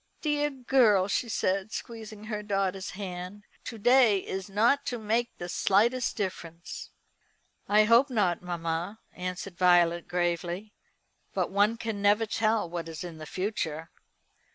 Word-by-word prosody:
"Dear 295 -1 +1
girl," 245 -8 +3
she 230 +4 -1
said, 195 0 0
squeezing 220 -3 -7
her 215 -1 -4
daughter's 195 -2 -1
hand, 185 +1 -7 0.2
"to 230 - -6
day 245 -1 +5
is 190 +1 -5
not 230 +8 +3
to 245 - -2
make 230 +2 -1
the 175 - -6
slightest 225 +8 +2
difference." 170 -4 -5 0.8
"I 210 +1 +6
hope 235 +5 +5
not, 205 -8 +1
mamma," 175 +3 -3
answered 180 0 -6
Violet 175 -1 +4
gravely; 175 +3 -2 0.6
"but - - 0
one 205 +3 +3
can 225 -3 -4
never 205 +2 +4
tell 220 -2 +1
what 170 -1 -5
is 160 +1 -6
in 170 -3 -8
the 155 - -8
future. 165 -5 -3
200 Hz, 140 wpm, -28 LUFS, 180-225 Hz, 0.8 s, I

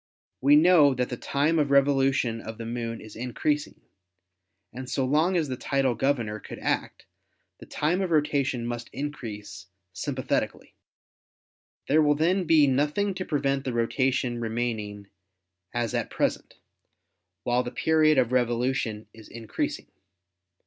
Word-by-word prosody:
We 140 +3 +6
know 155 -3 +6
that 125 0 -1
the 125 - -3
time 150 +6 0
of 145 -2 +1
revolution 135 -4 +2
of 110 0 -8
the 115 - -6
Moon 115 -1 -4
is 110 -1 -12
increasing, 125 +5 -2 0.9
and 130 +1 -7
so 135 - 0
long 155 +7 +2
as 160 -3 0
the 130 - -3
tidal 135 0 0
governor 115 -4 -1
could - - -9
act, - - -2 0.5
the - - -12
time 170 +6 0
of 190 - -1
rotation 145 -6 +1
must 120 0 -5
increase 105 -9 -7 0.3
sympathetically. 130 +8 -3 1.1
There 155 +3 +4
will 150 -1 +3
then 175 +5 +1
be 155 -3 +5
nothing 150 +9 +1
to 185 0 -5
prevent 140 -3 0
the 130 - -3
rotation 120 +1 0
remaining 110 -3 -3 0.7
as 120 -2 -2
at - - -1
present, - - -2 0.9
while 120 +1 +2
the 125 - -5
period 155 +3 +3
of 125 -2 +2
revolution 120 -3 0
is 110 -1 -14
increasing. 115 -2 -4
130 Hz, 140 wpm, -26 LUFS, 115-150 Hz, 1.1 s, We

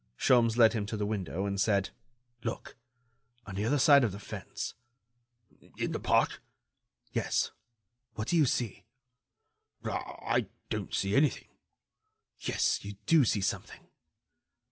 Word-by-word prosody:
Sholmes 120 -3 +4
led 115 -2 +7
him 105 -3 -2
to 110 - -3
the 105 - -1
window, 100 -3 -2
and 100 -1 -1
said: 100 -2 +2 0.5
"Look!... 115 - -5 0.7
on 100 - -8
the 100 +2 -2
other 145 +6 +2
side 140 0 +7
of 115 - +1
the 100 - -7
fence...." - - -6 1.0
"In - - -1
the - - -2
park?" - - +2 0.7
"Yes. - - 0 0.6
What 110 - -3
do - - +2
you 155 -5 +5
see?" 120 -4 -2 1.0
"I 115 -2 -2 0.2
don't 105 -3 -2
see 100 +1 0
anything." 145 0 +2 0.9
"Yes, - - 0
you 100 0 -7
do 160 +3 +5
see 105 -2 +1
something." 95 - -4
110 Hz, 135 wpm, -30 LUFS, 100-120 Hz, 1.0 s, led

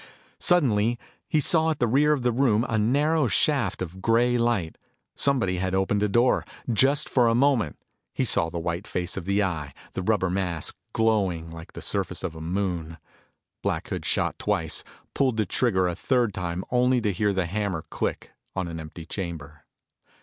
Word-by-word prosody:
Suddenly 120 -9 +3 0.3
he 155 - +3
saw 160 +2 +3
at 160 - 0
the 120 - +2
rear 140 +6 +3
of 145 -4 +1
the 125 - +3
room, 120 -2 +2
a 110 - 0
narrow 145 +6 +2
shaft 120 - +1
of 95 +2 -9
gray 120 +3 +3
light. 115 -9 0 0.3
Somebody 115 -10 +2
had 95 +1 -1
opened 95 +2 +1
a 105 - +2
door. 120 +5 +3 0.2
For 120 - -1
just 140 +6 +2
a 120 -3 +4
moment, 125 - +2 0.3
he - - -1
saw 80 - +1
the 85 - -5
white 85 +3 -3
face 90 0 -2
of 95 - -5
the 100 +2 +2
Eye, 75 -7 -3 0.2
his 95 - -3
rubber 95 -3 +1
mask 90 -4 -2 0.2
glowing 95 -8 +1
like 80 0 -10
the - - -8
surface - - -2
of 85 -3 -3
a 80 - -8
moon. 85 -2 -2 0.6
Black - - -2
Hood - - -3
shot - - 0
twice, - - 0 0.3
pulled 130 -5 +1
the 110 - +2
trigger 95 -2 +1
a 90 - -1
third 120 +2 +1
time 90 0 -3
only 125 +1 +3
to 105 -3 0
hear 105 +3 +1
the 95 -2 0
hammer 95 -2 -2
click - - -3 0.2
on 95 -2 -1
an 85 -1 -6
empty 80 +1 -9
chamber. 80 -6 -6
100 Hz, 185 wpm, -26 LUFS, 90-120 Hz, 0.6 s, a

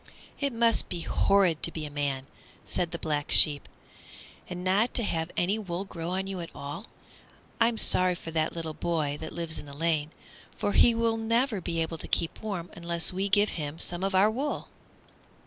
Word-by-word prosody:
"It 280 -1 0
must 230 -1 +2
be 175 -2 -4
horrid 190 -3 +2
to 170 - +1
be 155 -2 -5
a 150 - -8
man," 140 -2 -2 0.4
said 175 - 0
the 170 - -5
Black 150 -3 -2
Sheep, 145 -2 +7 0.8
"and 180 0 -6
not 200 +6 +2
to 240 - +2
have 165 -4 -1
any 195 +5 +1
wool 185 -2 -4
grow 170 -3 -6
on 190 +1 -2
you 195 -1 -5
at 170 -1 -6
all. 145 +10 -7 0.7
I'm 230 0 +3
sorry 185 -3 +3
for 165 - -8
that 160 -1 0
little 165 -2 -4
boy 150 -2 -2
that 160 - -6
lives 165 -2 -1
in - - -10
the 140 0 -10
lane, 155 -2 0 0.5
for 205 - -1
he 235 +3 +5
will 230 0 +1
never 230 -1 +1
be 165 -1 -1
able 160 0 -5
to - - -8
keep 165 - -1
warm 190 -6 -5
unless 170 0 -1
we 195 +2 -1
give 205 +1 +4
him 150 -1 -3
some 175 +2 -2
of 195 0 0
our 200 +3 +5
wool." 275 +6 -3
175 Hz, 200 wpm, -28 LUFS, 160-205 Hz, 0.8 s, Sheep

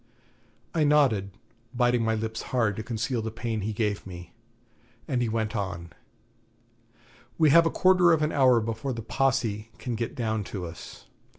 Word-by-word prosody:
I 160 - +2
nodded, 135 -10 +3 0.5
biting 120 -1 +2
my 110 0 +1
lips 110 0 -4
hard 115 -6 +1
to - - -3
conceal 115 +2 -2
the 110 - -3
pain 115 -1 -4
he 105 +3 -2
gave 105 -2 -2
me, 90 -1 -10 0.7
and 125 -3 0
he 120 - 0
went 110 -1 -2
on: 95 -5 -4 1.5
'We 155 -3 +5
have 165 +2 +6
a - - +2
quarter 180 -1 +4
of 160 -2 +3
an 150 - 0
hour 130 -4 +4
before 115 +4 -3
the 115 -1 -6
Posse 115 -5 0
can 125 - -4
get 115 +1 -3
down 110 -3 -1
to 95 -3 -5
us. 85 0 -10
115 Hz, 170 wpm, -27 LUFS, 105-130 Hz, 1.5 s, have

